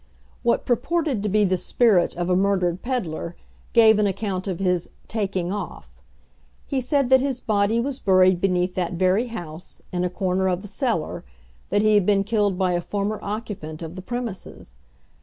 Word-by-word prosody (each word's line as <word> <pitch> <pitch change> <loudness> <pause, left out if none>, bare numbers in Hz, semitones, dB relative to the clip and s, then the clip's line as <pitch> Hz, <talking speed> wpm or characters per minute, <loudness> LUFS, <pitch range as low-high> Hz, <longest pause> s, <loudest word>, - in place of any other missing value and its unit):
What 235 - +1
purported 290 0 0
to 210 - -1
be 210 +1 +3
the 185 -1 +1
spirit 200 -2 +2
of 175 0 -2
a 180 - +2
murdered 185 -2 +1
peddler, 175 -9 -3 0.4
gave 220 -2 +6
an 210 - +3
account 195 -1 -3
of 185 -3 -2
his 180 -2 0 0.2
"taking 190 -5 -2
off." 205 +1 -7 0.6
He 270 -3 -1
said 265 0 0
that 260 -1 +7
his 270 -2 -1
body 215 0 +1
was 265 +2 -2
buried 185 -2 +4
beneath 180 -1 +1
that 180 -1 -2
very 185 +7 +2
house, 175 -7 -8
in 180 0 -1
a 180 - 0
corner 190 0 0
of 180 +1 -2
the - - -7
cellar; 220 - -2 0.5
that 205 +1 +2
he 215 0 +4
had 205 -3 +3
been 200 -1 +3
killed 205 -3 +1
by 185 -1 +1
a 175 0 0
former 205 +3 -2
occupant 200 -7 -5
of 165 0 -6
the 185 - -7
premises. 225 - -6
195 Hz, 180 wpm, -23 LUFS, 180-225 Hz, 0.6 s, that